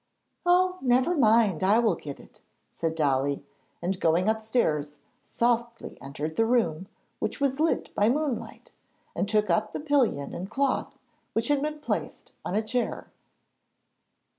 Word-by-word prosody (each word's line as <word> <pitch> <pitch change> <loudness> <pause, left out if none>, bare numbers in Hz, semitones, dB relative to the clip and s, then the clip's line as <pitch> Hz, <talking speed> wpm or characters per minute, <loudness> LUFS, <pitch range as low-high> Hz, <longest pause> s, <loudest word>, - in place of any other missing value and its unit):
'Oh, 365 +1 +3
never 255 +7 +3
mind, 220 - +4
I 200 +4 +5
will 230 -4 +3
get 145 -4 -8
it!' - - -17 0.3
said 165 -1 -2
Dolly, 140 -2 0 0.4
and, 185 +1 -1
going 170 +4 +2
upstairs, 220 - 0 0.3
softly 235 0 -1
entered 145 +3 -5
the 225 - +4
room, 190 -8 +1 0.3
which - - -3
was 275 0 0
lit 320 +1 0
by 205 +2 +3
moonlight, 285 -1 -2 0.4
and 200 - -1
took 210 -3 +2
up 215 +5 +1
the - - -3
pillion 270 - +1
and 185 +3 -5
cloth, 270 +3 -1 0.4
which 225 +3 -1
had 290 -1 +2
been 300 0 -3
placed - - -4
on 185 - -3
a 215 - +1
chair. 240 +3 -2
220 Hz, 145 wpm, -27 LUFS, 170-260 Hz, 0.4 s, I